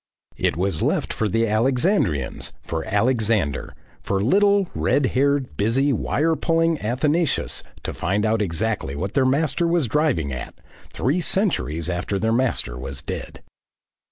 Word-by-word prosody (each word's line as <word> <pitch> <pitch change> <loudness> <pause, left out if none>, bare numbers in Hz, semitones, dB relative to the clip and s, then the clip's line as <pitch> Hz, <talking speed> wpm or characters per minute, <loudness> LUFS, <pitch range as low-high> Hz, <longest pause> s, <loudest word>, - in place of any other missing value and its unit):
It - - 0
was 90 -3 -1
left - - 0
for 110 - -1
the 115 +3 +1
Alexandrians, 115 - +1
for 80 -1 -3
Alexander, 105 - 0 0.3
for 100 - -1
little, 200 - +3
red 145 - +1
haired, 140 0 +1
busy, 130 +7 +2
wire 160 +7 +1
pulling 165 -1 +1
Athanasius 145 +8 0 0.2
to - - -3
find 100 +5 -1
out 110 0 +1
exactly 95 -5 -1
what 95 +7 -3
their 135 - +3
Master 155 +5 +1
was 170 -5 +1
driving 120 - 0
at, 65 - -6 0.4
three 140 - 0
centuries 85 - 0
after 90 +3 -2
their 110 +3 +1
Master 115 - 0
was 70 +2 -6
dead. - - -6
115 Hz, 140 wpm, -22 LUFS, 95-150 Hz, 0.4 s, little